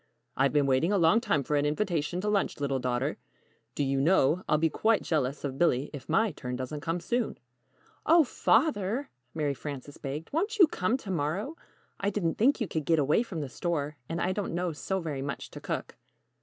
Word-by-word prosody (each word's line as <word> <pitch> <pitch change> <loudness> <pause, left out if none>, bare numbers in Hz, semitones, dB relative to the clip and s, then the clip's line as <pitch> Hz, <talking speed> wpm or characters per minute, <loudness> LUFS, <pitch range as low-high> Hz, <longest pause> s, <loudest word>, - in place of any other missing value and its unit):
"I've 135 +1 +3
been 145 -1 +3
waiting 135 +7 +2
a 205 - +3
long 185 +6 +4
time 175 - +1
for 150 - -1
an 145 - +2
invitation 175 0 -1
to 210 - -3
lunch, 205 -6 0
little 140 -2 0
daughter. 125 +3 -1 0.6
Do 145 - 0
you 135 0 +1
know, 165 +1 +3
I'll 155 - +4
be 165 +2 +3
quite 220 +7 +2
jealous 145 -3 -1
of 135 -2 -4
Billy 145 -5 +2
if 145 - -9
my 220 -2 +3
turn 125 -4 -5
doesn't 130 +4 -5
come 165 +3 -1
soon!" 235 +7 -1 0.7
"Oh, 330 +1 +6
Father," 245 -3 +1 0.2
Mary 150 -3 0
Frances 145 0 -7
begged, 145 - -6
"won't 410 +8 0
you 375 - +9
come 220 -4 0
to 210 -7 -7
morrow? 185 - -2 0.4
I 200 - +1
didn't 185 -5 -1
think 265 +6 +4
you 225 - -1
could 160 -4 -3
get 165 +1 +3
away 150 +7 +3
from 190 -9 -4
the 145 - -3
store, 150 -1 -2
and 165 +1 -2
I 180 - +1
don't 190 -3 -3
know 175 0 0
so 190 +5 -2
very 150 -5 -4
much 140 0 -5
to - - -9
cook." - - -4
165 Hz, 210 wpm, -29 LUFS, 145-205 Hz, 0.7 s, you